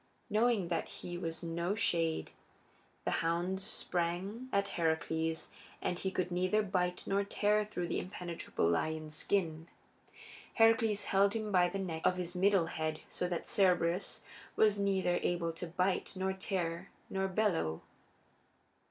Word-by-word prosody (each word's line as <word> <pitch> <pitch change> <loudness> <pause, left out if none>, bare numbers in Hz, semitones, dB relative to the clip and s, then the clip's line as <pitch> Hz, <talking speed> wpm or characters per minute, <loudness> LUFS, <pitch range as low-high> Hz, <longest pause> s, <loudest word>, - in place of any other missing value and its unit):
Knowing 215 -4 +3
that 170 - -1
he 175 - -7
was 165 -1 -4
no 170 +3 -1
shade, 165 -7 +1 0.7
the - - +1
hound 175 +3 0
sprang 190 +6 -2
at 200 0 +1
Heracles, 160 -1 -1 0.3
but 180 - -2
he 190 - -1
could 185 -1 -2
neither 185 +4 +2
bite 180 -2 0
nor 200 +1 +1
tear 210 +1 +2
through 180 -4 -3
that - - 0
impenetrable 175 - -2
lion's 155 - 0
skin. 165 -2 -1 0.9
Heracles 225 -2 +4
held 200 +1 +3
him 215 -2 -2
by 180 -2 +4
the 195 - -3
neck 170 -5 -3
of 180 - +4
his 180 -1 -4
middle 190 -1 +4
head 155 -1 -3
so 180 - -2
that 175 -2 -3
Cerberus 180 -1 +2 0.3
was 210 -2 +4
neither 190 -3 +2
able 170 -1 0
to 170 +2 -6
bite 180 +3 0
nor 190 0 0
tear 180 -3 -3 0.2
nor 190 0 -1
bellow. 185 - 0
180 Hz, 145 wpm, -34 LUFS, 170-200 Hz, 0.9 s, Heracles